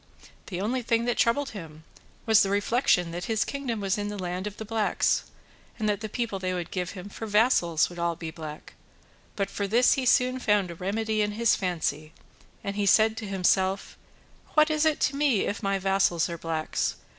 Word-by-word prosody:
The 180 -3 -4
only 240 +6 -1
thing 230 0 +1
that 240 - +1
troubled 270 +4 +2
him 160 -6 -10 0.4
was 220 -2 +6
the 195 - +2
reflection 200 -4 +2
that 175 +1 -5
this 220 -1 0
kingdom 270 -6 -3
was 195 0 -1
in 205 - -2
the 205 0 -5
land 180 +1 -3
of 210 - -7
the 220 - -6
blacks, 220 0 +1 0.5
and 215 - -1
that 205 -1 0
the 215 - -4
people 230 -3 -3
they 185 -1 -2
would 175 -1 -5
give 180 -1 -3
him 190 0 -8
for 220 +2 -7
vassals 205 -7 +3
would 175 - -11
be - - -4
all 170 0 0
black; 160 -2 -8 0.6
but 195 -1 -2
for 200 0 -2
this 235 +5 +4
he 260 -2 -1
soon 255 +1 +3
found 210 -6 +1
a - - -6
remedy 215 +5 -1
in 210 0 0
his 230 +1 +3
fancy, 160 -4 -2 0.5
and 200 0 0
said 220 +2 +5
he - - -13
to 220 - -5
himself, 190 0 +1 0.6
"What 310 0 +5
is 305 0 +2
it 310 -2 +2
to 275 - +1
me 280 -7 +2
if 205 - -2
my 195 -2 0
vassals 190 -3 +1
are 170 - -4
blacks? 160 -1 -2
205 Hz, 205 wpm, -27 LUFS, 180-225 Hz, 0.6 s, was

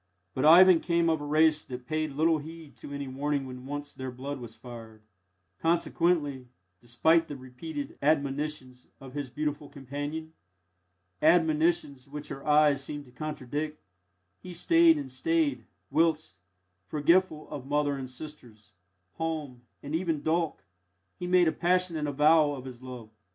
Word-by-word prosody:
But 130 - 0
Ivan 175 +2 +8
came 170 -1 +2
of 160 -2 -1
a - - -5
race 155 0 +4
that 125 -1 -8
paid 155 -1 -2
little 160 +2 +2
heed 160 0 -11
to - - -10
any 140 -1 -4
warning 140 +1 -2
when 130 0 -9
once 145 0 -5
their 130 0 -6
blood 135 +3 -6
was 115 -2 -9
fired; 115 -2 -11 0.6
consequently, 165 -5 +1 0.3
despite 160 - +2
the 145 - -6
repeated 135 +3 -7
admonitions 140 -3 -1
of 135 -1 -11
his 145 -2 -4
beautiful 150 +1 -3
companion 145 +4 -6 0.9
admonitions 160 -4 +2
which 150 +1 -7
her 140 - -7
eyes 150 -2 +4
seemed 145 +1 -6
to 125 - -18
contradict 150 +2 -4 0.6
he 180 - -9
stayed 330 - +5
and 285 -2 -5
stayed, 330 -3 0 0.3
whilst 160 - +1 0.5
forgetful 155 +1 +2
of 140 -3 -6
mother 145 0 +1
and 130 -2 -6
sisters, 125 -7 -10 0.4
home, 155 -6 -4 0.2
and 145 +1 -6
even 165 -3 -1
Dolk 165 +1 0 0.6
he 180 - -4
made 180 -1 +4
a - - +3
passionate 175 -3 0
avowal 150 +1 +4
of 130 -1 -9
his 125 -2 -9
love. 125 -4 -9
150 Hz, 145 wpm, -28 LUFS, 135-160 Hz, 0.9 s, Ivan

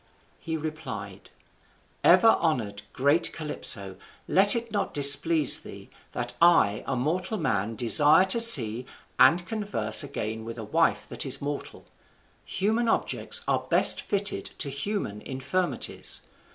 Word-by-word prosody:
He 160 -1 -6
replied: 155 0 -9 0.7
"Ever 225 - +5
honoured, 120 - -2
great 145 +5 0
Calypso, 100 - -2 0.3
let 200 +4 +5
it 235 -1 -5
not 205 -2 -4
displease 145 +1 +5
thee, - - -14 0.2
that 120 0 -4
I 165 - +2
a 135 - -3
mortal 175 - -3
man 110 - -3
desire 145 - +3
to 190 +5 +3
see 125 - +6 0.3
and 175 +1 +4
converse 200 - -1
again 110 +1 -6
with 115 +1 -9
a 115 - -8
wife 165 +10 -1
that - - -3
is 135 0 0
mortal: 145 0 -8 0.6
human 220 +5 -2
objects - - -2
are - - 0
best - - +3
fitted 200 0 -3
to 140 - -3
human 140 - -5
infirmities. 140 +8 -4
150 Hz, 130 wpm, -25 LUFS, 120-185 Hz, 0.7 s, see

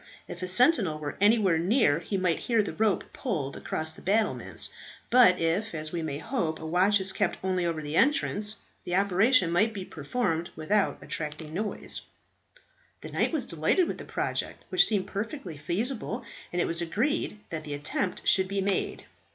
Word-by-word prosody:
If - - -8
a 185 - -2
sentinel 195 - +3
were 145 -2 -5
anywhere 205 -5 +4
near 175 - +3
he 195 +4 -3
might 180 -3 +1
hear 230 -3 +2
the - - -5
rope 215 -3 0
pulled 155 - -3
across 160 0 -3
the - - -12
battlements; 215 +4 0 0.4
but 235 -7 +7
if 170 +5 0
as 155 0 -4
we 170 - -2
may 150 -3 -3
hope, 160 - -2
a 160 - -7
watch 185 +5 +3
is 190 0 +2
kept - - 0
only 185 -2 0
over 160 -2 -2
the 150 +1 -4
entrance, 215 - +2 0.3
the 180 -1 -2
operation 195 +1 +4
might 210 +6 +2
be 190 -2 -5
performed 165 - -2
without 195 +6 +1
attracting 150 0 -5
notice." 210 +4 -3 1.0
The - - -8
knight - - +1
was 310 -5 -1
delighted 165 - +2
with - - -4
the - - -7
project, - - -3
which - - +5
seemed 205 -4 0
perfectly 205 - -5
feasible, 220 - -2 0.3
and 175 - -2
it - - +2
was 165 +1 0
agreed 215 - -1
that 155 -2 -4
the 145 -1 -4
attempt 150 +6 -3
should 190 -1 +4
be 195 +1 -2
made. 195 0 -1
185 Hz, 180 wpm, -28 LUFS, 160-215 Hz, 1.0 s, but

